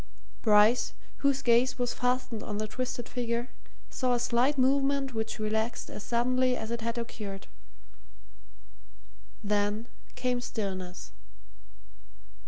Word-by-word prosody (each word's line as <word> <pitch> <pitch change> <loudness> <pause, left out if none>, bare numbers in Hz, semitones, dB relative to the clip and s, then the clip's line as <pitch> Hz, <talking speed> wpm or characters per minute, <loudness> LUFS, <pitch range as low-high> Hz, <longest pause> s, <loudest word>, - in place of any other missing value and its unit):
Bryce, 215 +2 +5 0.2
whose 275 -1 +1
gaze 245 +1 +4
was 245 -1 0
fastened 250 -3 -1
on 205 - -4
the 215 0 -2
twisted 250 +1 -4
figure, 240 0 -2 0.4
saw 255 -2 +1
a - - 0
slight 250 +5 +2
movement 270 0 +2
which 220 0 -2
relaxed 220 +1 -1
as - - -6
suddenly 250 +2 +2
as 220 +1 -5
it 235 0 -2
had 230 +1 -2
occurred. 210 -4 -5 2.0
Then 205 +2 0 0.3
came 250 -1 0
stillness. 190 -6 -4
235 Hz, 115 wpm, -29 LUFS, 215-255 Hz, 2.0 s, Bryce